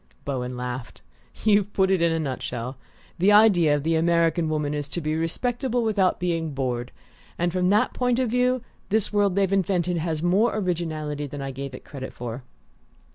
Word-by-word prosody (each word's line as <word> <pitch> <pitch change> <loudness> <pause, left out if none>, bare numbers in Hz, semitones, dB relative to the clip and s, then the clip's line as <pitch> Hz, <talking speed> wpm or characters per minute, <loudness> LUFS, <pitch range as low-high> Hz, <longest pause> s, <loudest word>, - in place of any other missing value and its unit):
Bowen 125 -2 -3
laughed. 125 0 -6 0.4
"You've 205 -1 +3
put 190 -1 +2
it 190 -3 +2
in 170 -1 +3
a 165 - 0
nutshell: 130 -4 -4 0.4
the 190 +4 +5
ideal 195 -8 +6
of 145 - -2
the 165 +1 +1
American 165 0 +2
woman 150 -1 -1
is 145 -1 -3
to 175 - -3
be 155 -1 -2
respectable 245 - -1
without 200 -4 +2
being 165 -4 -1
bored; 125 -2 -2 0.5
and 175 0 0
from 180 0 +1
that 205 +2 +3
point 250 -1 +1
of 255 -3 0
view 250 0 +2 0.3
this 215 0 +1
world 200 -3 +2
they've 195 -1 +2
invented 180 -2 +1
has 160 -1 -2
more 200 +7 +3
originality 155 -6 -2
than 140 0 -6
I 135 - -4
gave 135 0 -6
it - - -12
credit 135 -2 -7
for." 120 +1 -6
170 Hz, 185 wpm, -25 LUFS, 145-200 Hz, 0.5 s, ideal